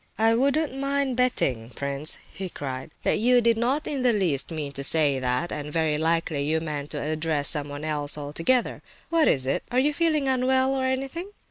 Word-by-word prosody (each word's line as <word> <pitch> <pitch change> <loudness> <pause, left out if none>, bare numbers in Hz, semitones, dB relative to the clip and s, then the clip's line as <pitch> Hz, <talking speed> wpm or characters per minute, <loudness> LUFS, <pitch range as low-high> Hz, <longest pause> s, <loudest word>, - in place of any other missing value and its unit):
"I 225 +1 +4
wouldn't 275 +4 +1
mind 275 -1 -1
betting, 135 - 0
prince," 140 +2 0 0.2
he 190 -1 -5
cried, 135 -2 -6
"that - - +1
you 245 +3 +4
did 230 -1 +3
not 255 +7 0
in 280 -3 -2
the 250 -2 +3
least 170 -10 0
mean 155 -4 -4
to 140 0 -5
say 145 -2 +3
that, 125 +5 -1
and 150 0 -5
very 155 -1 0
likely 165 -2 0
you 155 +3 +1
meant 150 -2 -5
to 150 - -3
address 155 -1 0
someone 145 -1 -3
else 150 -1 -1
altogether. 165 - 0 0.3
What 330 -2 +4
is 130 -2 +2
it? 135 - 0
Are 245 - -1
you 290 +3 +3
feeling 310 -3 +1
unwell 260 +1 +2
or 265 -1 -1
anything?" 270 +8 -3
165 Hz, 195 wpm, -25 LUFS, -, 0.3 s, I